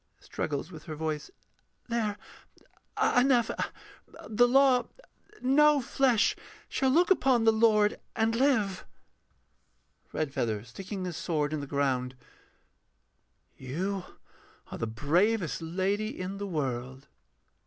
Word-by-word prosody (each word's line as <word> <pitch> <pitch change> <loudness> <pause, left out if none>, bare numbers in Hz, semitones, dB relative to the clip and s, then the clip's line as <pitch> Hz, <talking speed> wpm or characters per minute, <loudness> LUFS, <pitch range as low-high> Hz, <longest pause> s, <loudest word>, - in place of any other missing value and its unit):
[Struggles 150 +3 -4
with 155 -3 -11
her 155 - -6
voice.] 155 -1 -3 0.6
There... 225 -4 -1 0.8
enough... 245 -2 +3 0.8
the 235 +3 +4
law 255 -1 +4 0.6
No 295 +3 +5
flesh 250 -3 +2 0.3
shall 265 - 0
look 345 +8 +3
upon 260 -9 +3
the 225 - +6
Lord 215 -2 +3 0.2
and 225 0 +1
live. 225 -8 +1 1.3
REDFEATHER 120 -8 -2
[sticking 190 - -7
his 175 -3 -5
sword 150 -3 -1
in 155 - -1
the 140 - -6
ground]. 135 -2 -1 1.4
You 180 +9 -4 0.7
are - - -6
the 115 - -2
bravest 170 - +1
lady 195 +6 -2
in 190 +2 -5
the 200 - -4
world. 130 -5 -4
195 Hz, 110 wpm, -29 LUFS, 150-235 Hz, 1.4 s, the